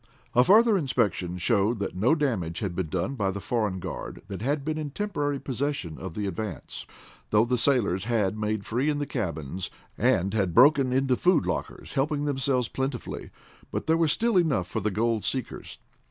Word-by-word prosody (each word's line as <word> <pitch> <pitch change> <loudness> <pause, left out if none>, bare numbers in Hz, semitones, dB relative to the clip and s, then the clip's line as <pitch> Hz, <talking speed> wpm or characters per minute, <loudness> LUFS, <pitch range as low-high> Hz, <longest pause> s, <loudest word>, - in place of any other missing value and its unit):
A 125 - +6
further 215 - +6
inspection 105 - 0
showed 105 +4 +2
that 100 - -3
no 115 - +3
damage 105 - -1
had 95 -5 -3
been 90 -4 -2
done 90 - -1
by 105 -7 0
the 100 +1 -3
foreign 105 -3 -1
guard 90 - -6
that 100 -1 -5
had 140 +3 -1
been 155 0 -1
in 150 -2 -3
temporary 145 -6 -2
possession 130 - -3
of 85 -2 -7
the 105 - -2
Advance, 95 -3 -5 0.4
though 105 +2 +4
the 125 +1 +1
sailors 115 -7 +1
had 110 -4 +1
made 105 -1 -2
free 125 +6 0
in 150 - 0
the 145 - -1
cabins, 90 - -3 0.3
and 95 +3 +2
had 95 -6 0
broken 135 0 +6
into 135 0 +2
the - - -2
food 180 -2 +4
lockers, - - -4
helping 145 +2 0
themselves 135 -3 +1
plentifully. 135 -2 -4 0.4
But - - -3
there 160 - +3
was 165 -2 +3
still 230 +2 +2
enough 150 - +2
for 110 - -3
the 110 +1 0
gold 110 +1 0
seekers. 130 -2 -4
120 Hz, 190 wpm, -27 LUFS, 100-145 Hz, 0.4 s, A